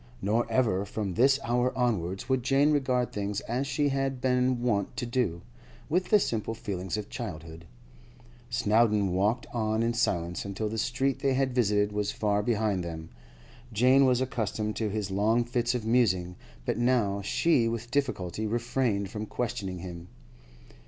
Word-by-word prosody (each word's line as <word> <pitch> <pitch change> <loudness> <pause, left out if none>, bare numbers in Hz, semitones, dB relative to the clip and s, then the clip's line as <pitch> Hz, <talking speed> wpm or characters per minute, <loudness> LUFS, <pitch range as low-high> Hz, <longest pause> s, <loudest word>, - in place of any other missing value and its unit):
Nor 110 +4 0
ever 110 -6 +2
from 100 -1 -4
this 135 +6 +4
hour 120 +2 +1
onwards 95 -7 -1
would 130 -1 +1
Jane 140 +4 +3
regard 130 -4 +1
things 100 0 -2
as 125 +4 -2
she 145 +2 +1
had 135 -1 -1
been 125 -1 +1
wont 115 0 0
to 130 - -2
do, 120 -9 -1 0.5
with 180 +4 +1
the 210 - +6
simple 115 - -2
feelings 95 -2 -4
of 105 -1 -5
childhood. 85 -9 -7 0.8
Snowdon 105 -4 +2
walked 105 +6 +1
on 110 -1 0
in 115 +1 +1
silence 85 -7 -1
until 100 +2 -3
the 110 +1 -3
street 130 +3 0
they 135 -1 +1
had 130 -1 +1
visited 105 -4 +2
was 105 0 -1
far 105 -1 0
behind 105 -4 0
them. 80 -1 -6 0.6
Jane 130 +5 +5
was 125 -1 +3
accustomed 110 -4 -2
to 110 -2 -1
his 100 -2 -3
long 110 +5 +2
fits 120 0 -1
of 115 -3 -3
musing, 95 -7 +2 0.3
but - - -1
now 120 -5 +2
she 120 +4 +2
with 115 +1 -4
difficulty 110 -8 -1
refrained 115 -3 -1
from 110 0 -5
questioning 100 -6 -3
him. 85 -1 -8
115 Hz, 160 wpm, -28 LUFS, 100-125 Hz, 0.8 s, the